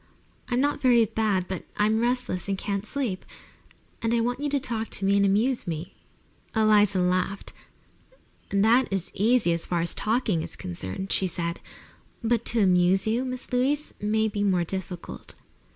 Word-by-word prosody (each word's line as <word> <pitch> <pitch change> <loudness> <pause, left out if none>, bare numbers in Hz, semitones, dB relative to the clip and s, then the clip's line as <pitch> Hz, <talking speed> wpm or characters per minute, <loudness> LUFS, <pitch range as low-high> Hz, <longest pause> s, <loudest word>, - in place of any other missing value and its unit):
"I'm 245 -1 +1
not 285 +2 0
very 240 -3 +5
bad, 200 -4 0
but 190 - -5
I'm 215 +1 +2
restless 245 -6 -1
and 195 - 0
can't 200 +1 -3
sleep, 245 -10 -3 0.8
and 230 +1 +1
I - - +2
want 245 +2 -1
you 290 0 -1
to 285 0 +1
talk 230 -5 -3
to 195 - -2
me 200 +1 +3
and 200 - +4
amuse 215 +6 +1
me." 165 +1 -5 0.6
Eliza 210 -3 +4
laughed. 185 +2 -1 1.0
"That 220 +6 +3
is 195 -2 0
easy, 215 -3 +3
as 170 - -3
far 175 - 0
as 170 +1 +2
talking 215 -6 0
is - - -3
concerned," 95 - -5
she 190 - +2
said. 170 -1 -3 0.6
"But 235 0 +1
to 230 -1 +2
amuse 185 +1 +3
you, 225 +3 +1
Miss 255 -1 -5
Louise, 280 +4 0
may 220 +1 +1
be 205 -1 -3
more 185 -4 +2
difficult." 180 0 -6
210 Hz, 170 wpm, -26 LUFS, 185-235 Hz, 1.0 s, very